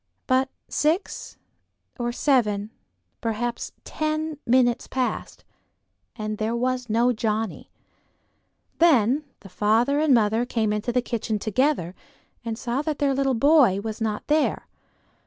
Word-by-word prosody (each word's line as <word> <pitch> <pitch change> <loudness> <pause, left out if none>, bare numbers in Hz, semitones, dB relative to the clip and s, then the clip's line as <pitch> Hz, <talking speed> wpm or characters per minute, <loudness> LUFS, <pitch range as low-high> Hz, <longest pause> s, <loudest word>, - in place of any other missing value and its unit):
But 260 0 +2 0.2
six 320 +6 -1 0.6
or 240 0 -1
seven, 220 -6 +1 0.5
perhaps 235 +1 -2
ten, 310 -1 -2
minutes 245 -1 +3
passed, 255 -1 -3 0.7
and 215 -2 -4
there 220 +2 -1
was 250 0 -1
no 235 +3 +3
Johnnie. 220 -2 -2 1.1
Then 290 -3 +4 0.2
the 195 - -12
father 220 +9 +2
and 310 -1 +2
mother 225 -1 +3
came 225 -3 0
into 210 +3 -2
the 250 0 +1
kitchen 225 -3 -2
together, 215 - 0 0.5
and 225 -1 -4
saw 245 +3 -2
that 305 -1 -2
their 280 -1 +1
little 270 -1 +1
boy 265 -6 +5
was 220 +2 -5
not 215 -1 -2
there. 305 +1 +1
240 Hz, 125 wpm, -24 LUFS, 220-275 Hz, 1.1 s, boy